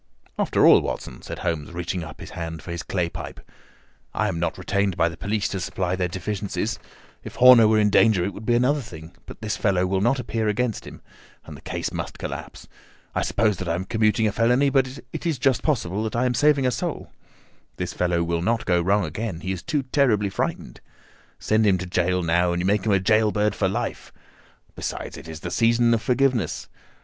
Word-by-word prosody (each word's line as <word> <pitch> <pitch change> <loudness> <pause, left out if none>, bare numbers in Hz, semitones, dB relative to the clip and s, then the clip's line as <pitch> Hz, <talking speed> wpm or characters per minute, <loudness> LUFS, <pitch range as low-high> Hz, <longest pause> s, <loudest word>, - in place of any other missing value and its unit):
"After - - +3
all, - - +8
Watson," - - -5
said - - -7
Holmes, 80 -2 -2
reaching 90 +1 -3
up - - -10
his - - -9
hand 80 -1 -6
for 85 - -7
his 85 -1 -4
clay 90 0 -1
pipe, - - -8 0.8
"I 105 -1 +1
am 85 -4 -3
not 85 - -1
retained 100 -2 -1
by 85 - +3
the 80 - -9
police 105 +4 -1
to 95 - -3
supply 90 0 -2
their 90 -1 0
deficiencies. 100 +3 -3 0.4
If - - -9
Horner 125 -3 +8
were 110 0 +3
in 105 -1 +3
danger 100 -4 +4
it 100 - -3
would 110 - -9
be 120 - +3
another 135 +5 +2
thing; 80 -6 -11
but - - -11
this 105 - -2
fellow 95 -3 +1
will 95 +1 0
not 120 +6 +2
appear 115 -2 -2
against 110 +1 -1
him, - - -11 0.4
and - - -9
the - - -13
case - - -4
must - - -5
collapse. - - -7 0.5
I - - 0
suppose 110 -4 +1
that 90 -1 -4
I 85 - +1
am 90 +2 -3
commuting 110 +1 +2
a 105 - +2
felony, 125 +6 +2
but 135 -2 +3 0.3
it - - -4
is 160 -4 0
just 130 0 +2
possible 105 - -1
that 110 0 -3
I 120 +2 +1
am 125 - +1
saving 145 0 +3
a 125 - +2
soul. 115 - -4 0.6
This 90 -1 -4
fellow 85 -1 0
will 85 0 -1
not 115 +5 0
go 90 -2 +2
wrong 100 +2 +2
again; 90 +2 -4
he 95 - -3
is 95 -2 -4
too 150 -5 -1
terribly 125 -7 +2
frightened. - - -4 0.6
Send 110 +1 +1
him 95 -2 +4
to 95 - -5
gaol 90 0 0
now, 85 +1 +2
and 85 - -1
you 90 - -1
make 100 +2 +1
him - - +3
a 100 - +4
gaol 110 +2 +3
bird 105 -1 +1
for 100 - 0
life. 110 +6 -4 0.6
Besides, - - -5
it - - -10
is 80 0 -8
the - - -5
season 115 0 +3
of 115 - +1
forgiveness. 125 - 0
105 Hz, 220 wpm, -24 LUFS, 90-115 Hz, 0.8 s, all